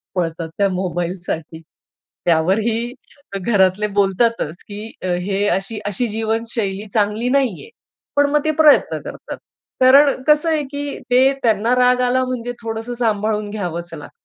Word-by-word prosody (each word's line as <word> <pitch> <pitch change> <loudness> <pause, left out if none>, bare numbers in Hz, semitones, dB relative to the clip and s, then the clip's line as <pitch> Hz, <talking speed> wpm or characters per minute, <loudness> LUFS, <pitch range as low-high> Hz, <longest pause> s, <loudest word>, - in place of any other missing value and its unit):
पळतात 165 -2 -2
त्या 200 -1 +2
मोबाईलसाठी. 175 -3 -4 0.6
त्यावरही 215 +8 +1 0.5
घरातले 195 0 +2
बोलतातच, 195 -4 0
की 210 +2 -8
हे 185 +3 -1
अशी-अशी 205 +3 -1
जीवनशैली 220 -2 -2
चांगली 215 +2 +1
नाहीये. 265 - 0 0.5
पण 285 0 +3
मग 295 0 +1
ते 310 - +3
प्रयत्न 300 -2 +5
करतात. - - -8 0.4
कारण 270 +1 +6
कसं 300 +2 +4
आहे, 310 -2 +1
की 285 0 -4
ते 260 +2 +5
त्यांना 225 +1 +2
राग 250 0 +3
आला 250 +1 +2
म्हणजे 245 -1 -4
थोडसं 225 +1 -5
सांभाळून 215 -3 -1
घ्यावंच 175 -5 -5
लागतं. 150 -3 -9
220 Hz, 125 wpm, -19 LUFS, 190-250 Hz, 0.6 s, कारण